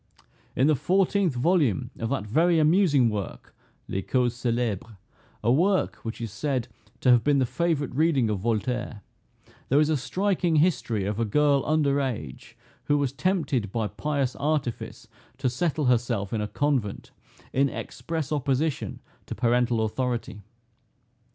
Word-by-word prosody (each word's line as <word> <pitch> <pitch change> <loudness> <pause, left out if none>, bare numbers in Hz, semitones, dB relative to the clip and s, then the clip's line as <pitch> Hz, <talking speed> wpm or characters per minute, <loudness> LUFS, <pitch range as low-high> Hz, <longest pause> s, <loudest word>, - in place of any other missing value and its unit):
In 130 - +3
the 155 - +4
fourteenth 185 - +1
volume 130 - +1
of 115 - -2
that 135 -5 -2
very 165 +10 +3
amusing 155 -5 +4
work, 100 - -5 0.3
Les 95 - -2
Causes 125 +2 0
Celebres, 115 -3 -2 0.5
a 115 - +3
work 185 +8 +2
which 110 0 -7
is 115 -3 -5
said 130 +1 -2 0.3
to 125 - +5
have 120 -2 +5
been 145 -1 +3
the 130 - +3
favorite 155 0 -1
reading 145 -4 +2
of 105 -2 -1
Voltaire, 120 0 -2 0.7
there 140 - +4
is 155 0 +3
a 155 - +2
striking 180 +3 0
history 145 - +1
of 105 +2 -2
a - - +2
girl 140 +5 +3
under 145 -2 +2
age, 90 - -5 0.3
who 145 - +2
was 140 -3 -1
tempted 140 - 0
by 115 0 -1
pious 135 +5 -2
artifice 145 -5 -2 0.3
to 130 -2 0
settle 155 +2 -1
herself 115 -5 +1
in 110 - 0
a 105 - -2
convent, 125 -2 -1 0.4
in 140 +1 +3
express 160 0 -5
opposition 145 +1 -1 0.3
to - - -5
parental 120 0 +2
authority. 120 -2 -3
130 Hz, 150 wpm, -26 LUFS, 115-150 Hz, 0.7 s, to